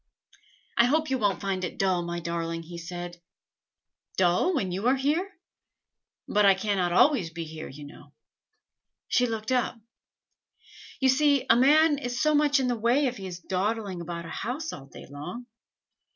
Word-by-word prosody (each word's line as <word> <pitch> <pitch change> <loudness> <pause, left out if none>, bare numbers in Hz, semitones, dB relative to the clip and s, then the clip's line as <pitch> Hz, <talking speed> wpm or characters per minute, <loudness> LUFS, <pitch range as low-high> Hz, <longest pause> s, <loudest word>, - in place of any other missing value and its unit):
"I 235 - +6
hope 310 +3 +1
you 260 - +1
won't 200 -5 0
find 195 -2 -2
it 175 - -4
dull, 185 -2 +1
my 170 0 -4
darling," 165 0 -3
he 170 +1 -9
said. 175 0 -7 1.0
"Dull, 185 - +2
when 190 -10 -1
you 195 +6 -2
are 260 - +4
here?" 305 +9 0 1.0
"But 210 - +2
I 195 -1 +6
cannot 195 -3 0
always 210 - +4
be 165 +1 -6
here, 160 0 -8
you 145 +2 -10
know." 145 0 -14 1.0
She 250 0 +3
looked 220 0 -4
up. 250 -1 0 1.2
"You 265 - +4
see, 285 +1 +3
a - - +7
man 295 +4 +5
is 245 -3 -4
so 305 0 +3
much 290 -1 +3
in 265 - 0
the 245 - +1
way 240 +6 +2
if 250 -2 -2
he 190 - -7
is 180 -1 -8
dawdling 195 0 -2
about 170 0 -6
a - - -8
house 265 - -4
all 135 -1 -10
day - - -12
long. 150 - -8
205 Hz, 175 wpm, -27 LUFS, 175-265 Hz, 1.2 s, a